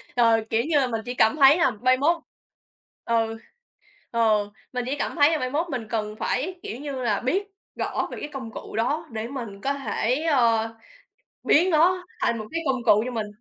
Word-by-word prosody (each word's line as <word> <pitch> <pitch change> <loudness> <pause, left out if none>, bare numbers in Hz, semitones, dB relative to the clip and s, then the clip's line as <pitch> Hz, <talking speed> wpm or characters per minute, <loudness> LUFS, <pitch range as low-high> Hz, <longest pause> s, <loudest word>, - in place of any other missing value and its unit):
ờ, 230 -2 +4
kiểu 225 +1 +1
như 310 -1 +2
là, 265 - +2
mình 225 -2 -3
chỉ 245 - -4
cảm 220 +2 +3
thấy 280 +2 +7
là 335 -7 +3
mai 255 +4 +2
mốt 330 +5 +2 0.8
ừ, 225 -1 0 0.7
ờ, 215 -3 +2 0.2
mình 250 -1 -2
chỉ 270 - -1
cảm - - -2
thấy 295 -1 +5
là 315 - 0
mai 255 - -2
mốt 320 +6 -1
mình 245 -6 -4
cần 215 -2 -2
phải, 350 +8 -2
kiểu 225 - -5
như 290 -1 -5
là, 210 -4 +1
biết 380 +11 -1 0.3
rõ - - -2
về - - -6
cái - - -5
công 255 -5 -6
cụ - - -9
đó 290 +9 -1
để 220 0 -4
mình 230 -7 -7
có 275 - 0
thể, 270 0 -1
ờ, 230 -7 +2 0.7
biến 345 +5 +4
nó 360 +3 +3 0.2
thành 235 - +1
một 215 - -5
cái 330 - -2
công 260 -2 0
cụ 210 -2 +5
cho 255 - -3
mình. 225 -3 -3
255 Hz, 210 wpm, -25 LUFS, 225-295 Hz, 0.8 s, thấy